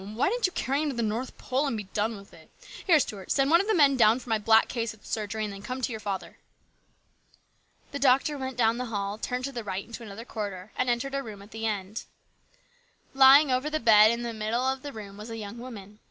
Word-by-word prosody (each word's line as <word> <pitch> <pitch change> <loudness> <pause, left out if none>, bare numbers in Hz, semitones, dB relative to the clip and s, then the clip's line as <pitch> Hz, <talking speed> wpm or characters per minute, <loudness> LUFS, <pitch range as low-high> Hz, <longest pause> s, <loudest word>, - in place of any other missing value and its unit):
Why 215 - -1
didn't 480 -1 +1
you - - -8
carry 275 +3 -1
him 310 - 0
to 275 - -4
the 235 - -1
North 225 +4 -3
Pole 270 +3 -1
and 235 - -2
be 210 - -4
done'with 205 +1 -4
it! - - -17 0.4
Here, 330 -4 +6
Stuart, 205 -8 -4
send 275 +1 +2
one 340 +2 +6
of 400 - -5
the 440 - +2
men 280 -5 +5
down 225 -1 +5
for 250 -1 -11
my 220 -1 +2
black 220 +1 +4
case 230 -3 -3
at 215 - -26
the - - -20
surgery, 215 0 -3
and 210 -1 -4
then 195 - -9
come 255 +5 -5
to 250 -1 -2
your 220 - -5
father." 200 -3 -5 1.5
The 285 - -4
doctor 270 +3 +3
went 265 -2 -5
down 230 0 +2
the 250 - -2
hall, 205 -2 -3
turned 250 +2 -3
to 275 - -4
the 240 -3 -5
right 195 -1 -4
into 235 +1 -9
another 225 +1 -9
corridor, 205 -4 -6
and 255 - 0
entered 245 +3 -1
a 275 - -1
room 210 -6 -9
at 205 - -17
the 225 0 -3
end. 205 0 -4 1.1
Lying 270 +2 +7
over 255 +4 0
the 310 0 -1
bed 215 -2 +7
in 235 +1 -1
the 235 -1 -4
middle 225 +4 -1
of 265 0 -1
the 285 - -7
room 205 -4 -9
was 210 +2 -9
a 225 - -6
young 215 +2 -7
woman. 210 -4 -10
230 Hz, 255 wpm, -27 LUFS, 210-265 Hz, 1.5 s, Lying